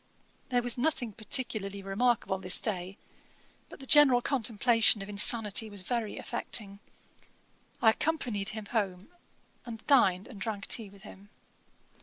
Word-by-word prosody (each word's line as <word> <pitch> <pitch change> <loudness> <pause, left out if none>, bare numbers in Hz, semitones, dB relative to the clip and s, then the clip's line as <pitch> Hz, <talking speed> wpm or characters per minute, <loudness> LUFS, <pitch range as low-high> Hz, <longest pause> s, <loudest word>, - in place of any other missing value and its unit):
There 245 -1 0
was 245 0 +1
nothing 245 -5 -2
peculiarly 200 -3 -1
remarkable 195 -1 -1
this 185 0 +2
day; 190 -3 -3 0.7
but - - -13
the 270 - -10
general 285 -4 +6
contemplation 230 -4 +1
of 195 - -11
insanity 215 +2 +3
was 200 -2 -8
very 230 0 -4
affecting. 200 -2 -4 1.0
I 220 - +6
accompanied 230 -8 -2
him 215 -1 -5
home, 200 -2 -4 0.5
and 225 -2 -10
dined 195 -10 +3
and 210 -6 -13
drank 205 -2 -4
tea 220 -4 -1
with 195 0 -18
him. 200 +2 -14
220 Hz, 135 wpm, -29 LUFS, 195-245 Hz, 1.0 s, general